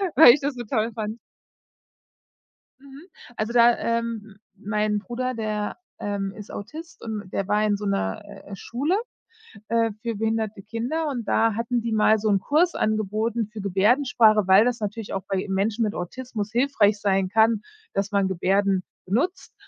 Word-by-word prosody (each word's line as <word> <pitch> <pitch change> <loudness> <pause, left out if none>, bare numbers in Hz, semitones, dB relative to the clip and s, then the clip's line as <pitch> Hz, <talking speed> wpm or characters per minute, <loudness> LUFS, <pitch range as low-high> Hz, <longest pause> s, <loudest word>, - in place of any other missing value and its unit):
weil 300 -6 +10
ich 295 - 0
das 280 -1 -2
so 240 - -5
toll 225 0 -1
fand. 215 +1 -4 1.6
Mhm, 280 +4 -14 0.3
also, 215 +2 -2
da, 235 0 +6
ähm 230 -3 -3 0.2
mein 210 0 -1
Bruder, 255 +4 -3
der, 215 -2 -3 0.2
ähm, 200 -1 -3
ist 210 - -10
Autist 320 +11 -9
und 210 -4 -5
der 195 - -1
war 210 +1 +2
in 205 -1 +2
so 205 - -6
'ner, 195 - -1
äh, 200 -1 -10
Schule, 280 - -1 0.7
äh, 230 -1 +2
für 230 -2 -3
behinderte 220 -1 -2
Kinder 250 +9 -2
und 240 -6 -4
da 225 -1 +3
hatten 235 +1 -1
die 230 0 -3
mal 215 0 +4
so 215 0 0
'n 200 -1 +3
Kurs 325 - +2
angeboten 215 +1 -1
für 215 -1 -8
Gebärdensprache, 215 +1 +3
weil 190 +3 +7
das 245 -2 0
natürlich 210 +1 -4
auch 195 - -3
bei 195 -1 -1
Menschen 210 +4 0
mit 210 0 -1
Autismus 215 +2 -5
hilfreich 230 -5 +2
sein 195 -2 +1
kann, 220 0 +3 0.3
dass 195 +1 -1
man 200 -1 +2
Gebärden 190 +1 +1 0.2
nutzt 265 - -1
215 Hz, 165 wpm, -24 LUFS, 205-235 Hz, 1.6 s, weil